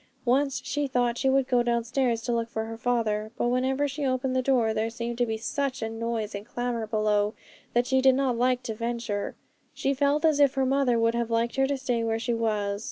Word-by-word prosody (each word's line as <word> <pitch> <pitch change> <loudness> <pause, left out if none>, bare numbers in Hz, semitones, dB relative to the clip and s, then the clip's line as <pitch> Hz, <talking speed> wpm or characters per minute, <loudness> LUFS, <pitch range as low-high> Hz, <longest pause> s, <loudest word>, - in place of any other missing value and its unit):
Once 270 +2 +1
she 290 -1 -1
thought 245 -2 +1
she 270 - +2
would 265 -1 +2
go 245 -2 +3
downstairs 240 0 0
to 245 - -1
look 230 0 -1
for 220 -1 -3
her 225 0 -6
father; 225 -3 0
but 240 - +1
whenever 260 +3 +1
she 285 +1 -5
opened 255 -1 0
the 260 - +3
door, 245 -4 +2
there 220 +1 -1
seemed 235 +1 -4
to 240 0 0
be 220 0 -2
such 270 +3 -2
a 225 - -2
noise 225 -1 -3
and 200 +2 -7
clamour 240 -2 -3
below, 210 -1 +1 0.4
that 240 0 +3
she 265 +1 +2
did 265 0 +5
not 265 -2 +1
like 250 +1 +1
to 230 -3 -3
venture; 230 -2 -3 0.4
she 275 - 0
felt 285 +3 +1
as 310 -2 +3
if 280 -2 +4
her 265 -1 +2
mother 265 -2 +2
would 230 0 +2
have 235 -1 -1
liked 230 +1 0
her 270 0 +2
to 280 0 -1
stay 250 -3 -1
where 225 0 0
she 235 +1 -1
was. 210 -3 -1
240 Hz, 230 wpm, -27 LUFS, 230-265 Hz, 0.4 s, did